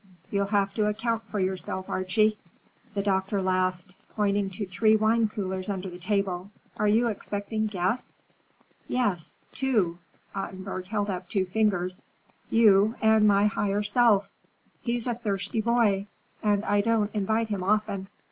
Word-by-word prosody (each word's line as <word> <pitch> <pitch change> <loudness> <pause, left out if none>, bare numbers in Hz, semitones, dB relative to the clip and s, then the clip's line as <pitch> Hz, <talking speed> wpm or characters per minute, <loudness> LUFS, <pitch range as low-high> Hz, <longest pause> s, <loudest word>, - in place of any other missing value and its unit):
You'll 200 -1 +1
have 200 -1 +1
to 215 -1 +1
account 225 +2 -1
for 210 0 -3
yourself, 190 0 -2
Archie." 215 +3 +1 0.6
The 200 - 0
doctor 195 0 0
laughed, 185 -1 0 0.2
pointing 205 -2 +1
to 195 +2 -4
three 215 +4 +3
wine 220 +1 +3
coolers 190 -3 -4
under 190 -2 -3
the 175 - -9
table. 195 -1 -1 0.3
"Are 210 - +1
you 220 +3 +4
expecting 215 +1 -3
guests?" 195 +4 -3 0.6
"Yes, 200 -10 -1
two." 215 -10 0 0.3
Ottenburg 190 -1 -5
held 205 0 -1
up 180 -1 -5
two 195 -3 +1
fingers,—"you, 200 +2 +1
and 220 -1 +5
my 200 0 +4
higher 205 0 0
self. 210 -1 +3 0.5
He's 235 -1 -2
a 245 - 0
thirsty 220 -1 -2
boy, 215 -4 +2 0.3
and 210 -1 +1
I 205 0 +3
don't 220 -1 +1
invite 220 +2 0
him 200 -3 -2
often. 200 0 0
205 Hz, 140 wpm, -27 LUFS, 190-220 Hz, 0.6 s, and